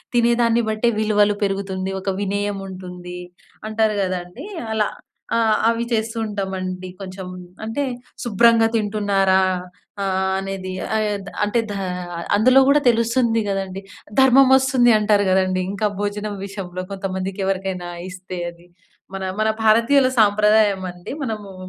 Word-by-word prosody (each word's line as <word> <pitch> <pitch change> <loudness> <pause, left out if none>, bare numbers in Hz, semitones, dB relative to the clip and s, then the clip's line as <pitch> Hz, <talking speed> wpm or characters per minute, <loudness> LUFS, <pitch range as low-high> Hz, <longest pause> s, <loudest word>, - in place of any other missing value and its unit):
తినేదాన్ని 235 0 +3
బట్టే 220 +2 +1
విలువలు 210 -1 +3
పెరుగుతుంది. 195 -1 -3
ఒక 195 - -3
వినయముంటుంది, 190 -3 -4 0.5
అంటారు 220 -1 +1
గదండీ. 180 - -5 0.3
అలా. 215 -1 +1 0.5
ఆ! - - +3 0.3
అవి 230 0 0
చేస్తూ 225 +1 -1
ఉంటామండి 185 -2 -4
కొంచం. 185 -1 -7 0.4
అంటే, 225 +6 -2 0.4
శుభ్రంగా 230 0 +4
తింటున్నారా? 200 -3 +2 0.6
ఆహ్, 190 0 0
అనేది. 195 -1 -5 0.2
ఆయద్ 210 -2 -1 0.2
అంటే, 210 +3 +1
దా - - -4 0.6
అందులో 255 +5 +5
గూడా 290 +1 +5
తెలుస్తుంది 230 0 +2
గదండీ. 195 0 -3 0.4
ధర్మమొస్తుంది 265 -1 +5
అంటారు 205 -1 +3
గదండీ, 185 0 +2
ఇంకా 210 +1 0
భోజనం 205 0 -3
విషయంలో, 185 -2 -6
కొంతమందికకెవరికైనా 190 -1 -3 0.2
ఇస్తే 185 0 -8
అది. 170 +1 -16 0.5
మన, 190 - -4 0.2
మన 215 - +2 0.2
భారతీయుల 235 +5 +5
సాంప్రదాయమండి. 205 -4 +2
మనమూ, 210 -5 -5
205 Hz, 110 wpm, -21 LUFS, 190-225 Hz, 0.6 s, అందులో